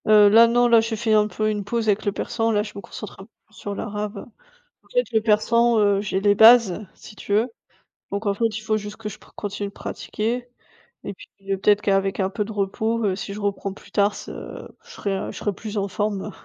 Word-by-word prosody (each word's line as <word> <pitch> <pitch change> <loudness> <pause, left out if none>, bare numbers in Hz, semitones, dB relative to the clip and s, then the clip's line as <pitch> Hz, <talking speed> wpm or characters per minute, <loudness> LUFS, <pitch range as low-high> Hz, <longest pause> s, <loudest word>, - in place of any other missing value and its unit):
Heu, 210 -1 +7
là 230 +3 +7
non, 240 +1 +3
là 230 -1 +6
j'ai 225 0 -2
fait 220 0 0
un 210 -1 +4
peu 215 0 -1
une 210 -1 -3
pause 230 +2 -2
avec 210 +1 +1
le 205 - +2
persan, 225 +3 -2
là 210 -1 +2
je 210 - -8
me 200 - -6
concentre 210 +1 -9
un 195 - -10
peu - - -27 0.2
sur 205 -2 -6
l'arabe. 210 0 -5 0.6
En - - -26
fait - - +1
le 220 - +3
persan, 230 +2 +3
heu, 205 -1 +3
j'ai 195 -1 -2
les 205 0 +4
bases, 220 -2 +6
si 210 - -14
tu 200 - -4
veux. 225 +4 +2 0.6
Donc 200 +2 -3
en 200 - +2
fait, 230 +4 -1
il 215 -1 -5
faut 215 0 0
juste 210 0 -7
que 225 - -7
je 210 - -7
pra - - -21
continue 205 0 -4
de - - -20
pratiquer. 240 +5 -4 0.6
Et 200 - -4
puis - - -15 0.3
peut-être 205 +1 +3
qu'avec 195 -1 +1
un 190 -1 +1
peu 210 +2 -2
de 220 - -7
repos, 220 +3 -1
heu, 190 -2 +1
si 200 +1 -6
je 205 - -7
reprends 200 -1 -2
plus 200 - -17
tard 205 0 +2
ce - - -8 0.2
je 475 - -20
serai 200 - -3
je - - -10
serai 205 - -2
plus 215 +2 -7
en 200 0 0
forme. 205 +1 -2
210 Hz, 240 wpm, -23 LUFS, 200-225 Hz, 0.6 s, Heu